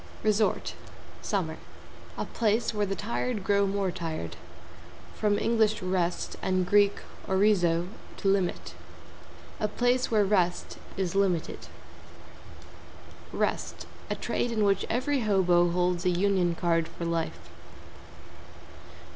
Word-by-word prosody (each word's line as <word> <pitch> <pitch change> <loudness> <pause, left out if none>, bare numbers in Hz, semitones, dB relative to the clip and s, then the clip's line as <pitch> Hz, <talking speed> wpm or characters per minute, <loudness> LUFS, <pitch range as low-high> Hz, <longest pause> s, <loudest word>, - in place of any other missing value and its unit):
=RESORT= 215 0 +1 0.5
(=SUMMER=) - - -2 0.6
A - - -2
place 225 0 0
where 210 -1 0
the 195 - -2
tired 225 0 -2
grow 200 0 +3
more 195 -1 0
tired. 155 - -5 0.8
From 210 -1 +1
Eng. 230 +2 0 0.2
rest, 180 -2 -1
and 185 -1 0
Grk. 205 0 +5 0.3
orizo, 185 -4 +3 0.3
to 200 - -2
limit. 195 -2 0 0.9
A 215 - +1
place 245 +4 +1
where 215 -3 +3
rest 180 -3 0 0.2
is 185 -3 -1
limited. 190 -4 0 1.6
=REST= - - -2 0.2
A - - 0
trade 240 - -2
in 220 -2 +1
which 195 -1 +2
every 270 +4 +1
hobo 180 -5 +3
holds 180 0 0
a 180 - +3
Union 180 -1 +2
Card 165 -1 +1
for 170 - -7
life. 165 -1 -3
195 Hz, 115 wpm, -28 LUFS, 175-210 Hz, 1.6 s, Grk